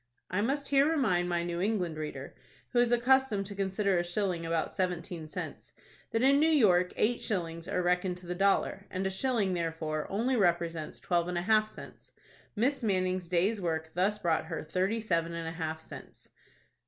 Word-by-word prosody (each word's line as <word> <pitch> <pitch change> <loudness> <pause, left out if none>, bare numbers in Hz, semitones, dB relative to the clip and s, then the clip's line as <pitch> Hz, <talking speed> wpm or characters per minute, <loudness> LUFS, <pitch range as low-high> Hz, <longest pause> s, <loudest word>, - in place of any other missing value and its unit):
I 185 +3 +1
must 275 +5 -1
here 280 +1 +4
remind 210 - +1
my 175 -1 0
New 175 0 -3
England 185 -5 0
reader, 150 -3 -6 0.4
who 245 - +4
is 240 0 +3
accustomed 245 -4 +3
to 200 - -7
consider 195 -1 0
a - - 0
shilling 175 -2 -2
about 165 -1 -1
seventeen 175 -2 -3
cents, - - -7 0.4
that 225 +2 0
in 275 +1 +5
New 315 +2 +4
York 185 - +4
eight 235 +3 +1
shillings 170 -5 -3
are 180 - -1
reckoned 180 +1 +1
to 180 - -13
the 175 - -3
dollar, 195 +1 +1
and 190 +1 -3
a 190 - 0
shilling, 210 -2 0
therefore, 160 -3 -2
only 235 +6 0
represents 170 -6 0
twelve 175 -1 0
and 180 -1 -2
a 175 - -1
half 215 +1 +3
cents; - - -13 0.4
Miss 260 +7 +1
Manning's 185 -4 0
day's 195 +5 +1
work 160 -2 -2
thus 195 +4 +1
brought 165 -6 0
her 160 -1 -4
thirty 185 +8 0
seven 170 -6 -1
and 165 -1 -4
a - - -3
half 160 -1 -4
cents. 160 - -12
185 Hz, 190 wpm, -30 LUFS, 170-215 Hz, 0.4 s, in